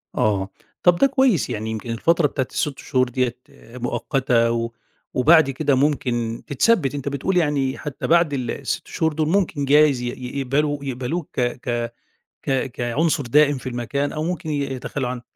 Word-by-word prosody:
آه. 100 -2 +1 0.3
طَب 175 -1 +6
ده 275 - +4
كويس، 265 - +2
يعني 110 +1 -3
يمكن 110 +2 -5
الفترة 165 +7 +2
بتاعة 130 -2 -2
ال6 145 -3 -2
شهور 130 -1 0
ديّة 125 -1 -1 0.4
مؤقتة 120 -1 +1
و 115 0 -2 0.4
وبعد 155 +2 +5
كده 140 +1 +1
ممكن 125 -5 0
تتثبِّت، 145 - +2
أنت 140 0 -3
بتقول 180 +7 -1
يعني 145 -5 +1
حتّى 150 -3 -5
بعد 170 -2 +4
ال 125 -4 -2
ال6 - - -4
شهور 160 -1 0
دُول 155 0 0
ممكن 170 -6 +1
جايز 145 -2 +4
ي - - -3
ي 125 +2 -5
يقبلوا 140 +2 0
يقبلوك 135 +5 -3
ك - - +3 0.2
ك 120 -2 -2 0.5
ك 135 -1 -1
كعنصر 140 +6 0
دائم 145 +3 +4
في 130 - -6
المكان 125 +4 -2
أو 155 - -3
ممكن 175 -1 -3
ي 145 -1 -1
يتخلّوا 130 0 -3
عن 125 -1 -5
135 Hz, 170 wpm, -22 LUFS, 125-150 Hz, 0.5 s, طَب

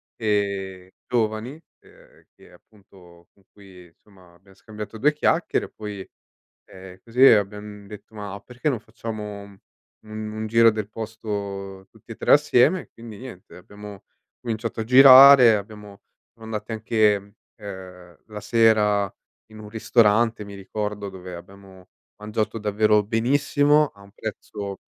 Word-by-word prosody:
ehm, 100 -4 -3 0.2
giovani, 110 0 -2 0.3
ehm, - - -22
che - - -20
appunto, 90 -5 -21
con 100 - -30
cui 95 -3 -16
insomma 90 +1 -23
abbiam 95 +2 -23
scambiato 105 +2 -10
2 150 +7 +2
chiacchiere 160 +3 0
e - - -14
poi, 105 -3 -9 0.6
ehm, 95 0 -13
così 120 +2 -1
abbiam 105 -2 +1
detto: 105 +2 -13
"Ma 100 -2 -8
perché 125 +5 -4
non 120 - -3
facciamo 110 -3 -8
u 100 -1 -15 0.5
un 110 0 -6
giro 115 +1 +5
del 110 -1 -5
posto 100 -3 -7
tutti 110 +1 -14
e - - -8
3 - - +1
assieme?". 150 +4 +4
E - - -16
quindi 115 -3 -11
niente, 125 -8 -12
abbiamo 105 +1 -12 0.4
cominciato 115 -1 -5
a - - -2
girare, 130 0 +8
abbiamo 105 -1 -8 0.3
siamo 115 -1 -14
andati 110 0 -6
anche, 105 -2 0 0.3
ehm, 90 -3 -11
la 105 -1 -8
sera 105 -3 +2 0.4
in 110 - -13
un 105 - -11
ristorante, 110 0 +1
mi 100 - -10
ricordo, 105 +1 -5
dove 90 -1 -10
abbiamo 95 +1 -14 0.3
mangiato 105 +1 -4
davvero 105 0 +2
benissimo, 145 +6 +1
a 100 - -23
un 100 0 -17
prezzo 105 -2 -7
105 Hz, 140 wpm, -23 LUFS, 100-115 Hz, 0.6 s, girare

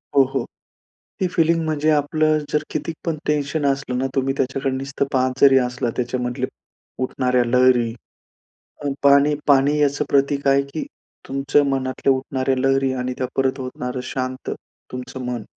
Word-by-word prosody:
हो, 140 - +7
हो. 135 -1 -2 0.8
ती 185 - +1
फिलिंग 165 -1 +2
म्हणजे 155 0 0
आपलं 155 +1 +2
जर 150 0 +1
किती 155 +2 -3
पण 165 -2 -1
टेन्शन 150 0 0
असलं 135 -2 -3
ना, 130 - 0
तुम्ही 135 0 +1
त्याच्याकडे 135 +1 -1
नुसतं 135 +1 -2
पाहत 130 0 +1
जरी 135 -1 +7
असलं, 125 -1 -2
त्याच्यामधल्या 125 +1 -2 0.6
उठणाऱ्या 125 -1 +1
लहरी, 125 -1 +3 0.9
अ, - - 0
पाणी 140 +1 +5
पाणी 140 +1 +4
याचं 145 -1 +1
प्रतीक 140 0 +1
आहे, 140 0 +4
की 140 +3 -6 0.4
तुमच्या 135 +2 +2
मनातल्या 135 0 +1
उठणाऱ्या 130 0 -1
लहरी 135 0 +2
आणि 125 0 -2
त्या 130 - -1
परत 135 0 +1
होणारं 125 0 -4
शांत 130 0 -3 0.4
तुमचं 125 0 -6
मन. 125 -2 -3
135 Hz, 150 wpm, -21 LUFS, 130-145 Hz, 0.9 s, हो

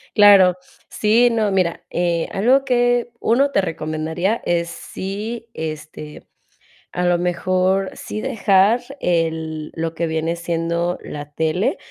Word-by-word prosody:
Claro, 200 -4 +7 0.3
sí, 230 +3 +3
no, 220 -3 0
mira, 180 -3 0
eh, 170 -1 0
algo 260 +7 +3
que 245 -1 +1
1, 275 +5 +2
te 195 - +2
recomendaría 160 +4 -2
es 170 -1 0
si, 215 +7 -6
este, 155 -1 -7 0.7
a 180 - -2
lo 175 0 +3
mejor, 185 +2 0
sí 215 - -6
dejar 215 -2 +3 0.2
el 160 -2 -1
lo 165 0 -3
que 170 0 -1
viene 160 +1 -1
siendo 170 +1 -2
la 145 0 -8
tele. 160 - 0
180 Hz, 125 wpm, -20 LUFS, 165-215 Hz, 0.7 s, Claro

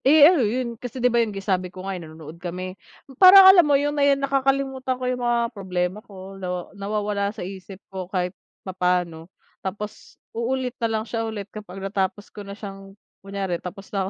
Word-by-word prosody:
Eh, 290 +2 +8
ano 335 -2 +6
yun? 235 +1 -2
Kasi, 250 +1 -7
'di 250 -1 +2
ba, 235 - +4
yung 230 - 0 0.2
sabi 185 -2 0
ko 185 +1 -10
nga, 195 - -3
ay, 180 - -6
nanonood 160 0 -11
kami 185 +1 -5 0.5
parang 380 +1 +11
alam 365 - +8
mo 290 -4 +3
yung 290 +1 0
nakakalimutan 275 -2 +1
ko 255 - -5
yung 250 0 -1
mga 235 0 +1
problema 185 -1 -2
ko, 195 -3 -11
na 180 0 -4
nawawala 200 0 -2
sa 205 - -7
isip 190 0 -9 0.2
ko 185 -2 -5
kahit 180 -1 -1 0.3
papaano. 180 -3 -1 0.3
Tapos, 205 +2 -7 0.2
uulit 250 +2 -2
na 230 - +1
lang 220 -1 -1
siya 230 0 -3
ulit 210 -2 -5
kapag 205 -3 -9
natapos 195 +1 -2
ko 210 - -8
na 200 0 -9
siyang, 195 -1 -10 0.2
kunyari 195 -3 -3
tapos 195 +3 -9
na 195 -1 -1
205 Hz, 185 wpm, -23 LUFS, 185-250 Hz, 0.5 s, parang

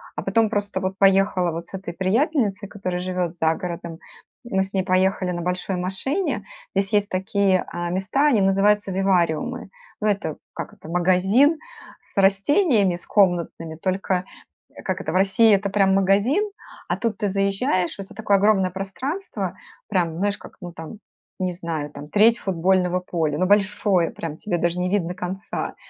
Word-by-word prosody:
а 150 - -3
потом 215 +3 +2
просто 205 -3 -2
вот 190 0 -3
поехала 195 -2 +3
вот 165 +1 -6
с - - -13
этой 190 -2 -6
приятельницей, 205 - 0
которая 185 -3 -4
живет 180 -2 -2
за 160 -1 +2
городом. 170 -2 -6 0.5
Мы 190 -5 +1
с 195 - -8
ней 190 -1 +1
поехали 185 0 +1
на 175 -1 -3
большой 180 +2 -2
машине, 195 - -1 0.3
здесь 195 +2 0
есть 205 0 +2
такие, 190 0 +1
а, 175 0 -3
места, 195 +11 +1
они 250 -8 +4
называются 195 +1 +3
вивариумы. 190 +4 0 0.3
Ну 215 - +1
это, 200 -7 -1 0.2
как - - -6
это, - - -14
магазин 190 - +3 0.4
с - - -20
растениями 200 - +3
с 175 - -7
комнатными, 175 -4 +1
только, 185 +1 -1 0.5
э, - - -13
как - - -2
это, - - -3
в - - -4
России- 195 +4 +5
это 200 +1 -1
прям 195 -1 +3
магазин, 200 - +3 0.4
а - - -1
тут 225 -4 -2
ты 205 - -1
заезжаешь, 195 -1 0
в - - -26
это 195 +1 -11
такое 205 -1 +2
огромное 195 -3 +3
пространство, 260 - -4 0.3
прям 170 -4 0
знаешь, 205 +2 0
как, - - -13
ну 175 -1 -7
там, 170 +6 -9 0.4
не 185 -1 0
знаю, 165 -4 -4
там 145 +1 -10
треть 225 +3 +5
футбольного 180 0 +1
поля. 160 -5 -1
Ну 185 - +1
большое 200 -3 +2
прям, 160 -2 -6
тебе 175 -5 -2
даже 170 +1 0
не 180 0 0
видно 180 -3 0
конца. 185 +2 -4
190 Hz, 170 wpm, -23 LUFS, 180-205 Hz, 0.5 s, России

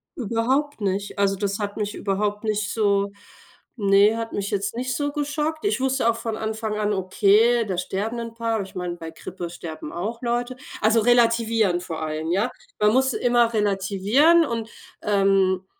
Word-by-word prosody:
Überhaupt 250 +4 -1
nicht. 200 +1 -2
Also, 195 -1 +2
das 200 0 -1
hat 205 -1 -4
mich 210 0 -3
überhaupt 205 +1 -1
nicht 215 -1 -1
so 200 -2 +1 0.6
ne, 200 +1 +4
hat 230 0 -4
mich 200 0 -3
jetzt 200 +1 -2
nicht 255 +1 -2
so 290 -1 -1
geschockt. 300 +2 -2
Ich 410 - +1
wusste 265 -2 +2
auch 230 - 0
von 225 -1 -3
Anfang 220 -1 -3
an: 210 0 0
„Okay, 205 +5 +3
da 190 -3 -3
sterben 205 +6 -3
'n 230 -1 -6
paar, 230 -1 -1
aber 215 - -1
ich 190 - -15
meine, 180 -1 -4
bei 165 -1 -8
Grippe 175 +1 -7
sterben 160 -3 -8
auch 220 +7 -4
Leute 240 +1 -2 0.2
"also, 220 +1 +4
relativierend 230 -5 +3
vor 160 -3 -5
allem, 155 +1 -3
ja? 210 +7 +1 0.3
Man 210 0 +4
muss 265 +1 +3
immer 240 -1 +2
relativieren 210 - +3
und, 230 -4 -4 0.3
ähm 195 -2 +2
215 Hz, 175 wpm, -23 LUFS, 195-235 Hz, 0.6 s, ne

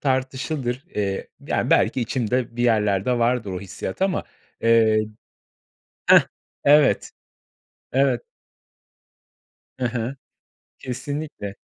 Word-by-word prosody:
tartışılır. 130 0 -1
Eee, 100 -2 -2 0.2
ya, - - 0
belki 130 - +3
içimde 120 0 -1
bir 120 - 0
yerlerde 110 0 +2
vardır 120 -3 +1
o 90 - -4
hissiyat 100 - -5
ama, 195 -2 +1 0.4
eee 115 -1 +4 1.1
Heh, - - +9 0.4
evet, 145 0 +5 0.8
evet. 130 -2 +2 1.6
Hı 125 - +1
hı. 120 +3 -3 0.6
Kesinlikle. 130 -5 -5
125 Hz, 90 wpm, -23 LUFS, 110-130 Hz, 1.6 s, Heh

